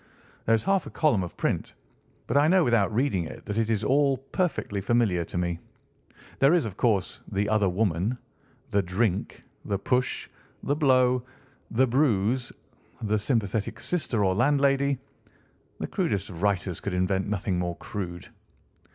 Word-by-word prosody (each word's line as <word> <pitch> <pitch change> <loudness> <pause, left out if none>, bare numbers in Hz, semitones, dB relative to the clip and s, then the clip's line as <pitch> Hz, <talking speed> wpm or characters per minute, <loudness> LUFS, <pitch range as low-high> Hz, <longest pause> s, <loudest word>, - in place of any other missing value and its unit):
There 115 - +5
is 110 - -2
half 195 -2 +1
a - - -6
column 145 -11 +2
of 90 - -6
print, - - -2 0.5
but - - -3
I 145 +2 +5
know 185 +1 +5
without 115 -4 +2
reading 110 -7 +1
it - - -10
that 105 +1 -2
it 115 -1 0
is 110 -1 0
all 140 +3 +3
perfectly 135 - -2
familiar 100 -5 +2
to - - -6
me. 85 -1 -1 0.8
There 140 +5 +5
is, 170 - +2
of 105 -4 -5
course, 105 -5 0
the 100 +1 0
other 105 -2 +2
woman, 95 +4 0 0.5
the 100 - +3
drink, 95 +2 -1 0.2
the 100 - -1
push, 125 +5 0 0.4
the 145 - +1
blow, 130 -4 +3 0.5
the 130 +4 +3
bruise, 120 -2 +1 0.5
the 110 0 +1
sympathetic 110 -2 -1
sister 125 - 0
or 95 - +2
landlady. 140 +3 +2 0.8
The - - -3
crudest 100 +1 -1
of 85 -1 -9
writers 100 -3 0
could 100 -3 -3
invent 95 +2 0
nothing 100 -3 -1
more 85 -1 -2
crude." 90 -4 -6
110 Hz, 160 wpm, -27 LUFS, 95-130 Hz, 0.8 s, There